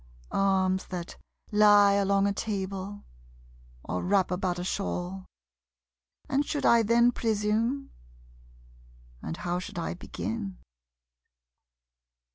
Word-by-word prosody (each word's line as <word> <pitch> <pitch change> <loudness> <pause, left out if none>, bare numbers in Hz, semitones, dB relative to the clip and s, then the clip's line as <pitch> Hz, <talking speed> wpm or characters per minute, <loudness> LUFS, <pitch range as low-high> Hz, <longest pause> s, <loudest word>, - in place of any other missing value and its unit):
Arms 190 -1 +1
that 180 -2 -6 0.4
lie 205 -1 +6
along 200 0 +2
a 200 - +1
table, 200 -1 -4 0.8
or 90 - -3
wrap 190 0 +2
about 180 -1 -1
a 175 - -3
shawl. 185 0 -3 1.0
And 275 +2 +1
should 290 -1 -3
I 235 -1 +6
then 235 +2 +4
presume? 225 +4 -1 1.3
And 80 - -5
how 175 0 -2
should 180 - -8
I 170 - -2
begin? 195 +2 -5
200 Hz, 100 wpm, -28 LUFS, 185-215 Hz, 1.3 s, lie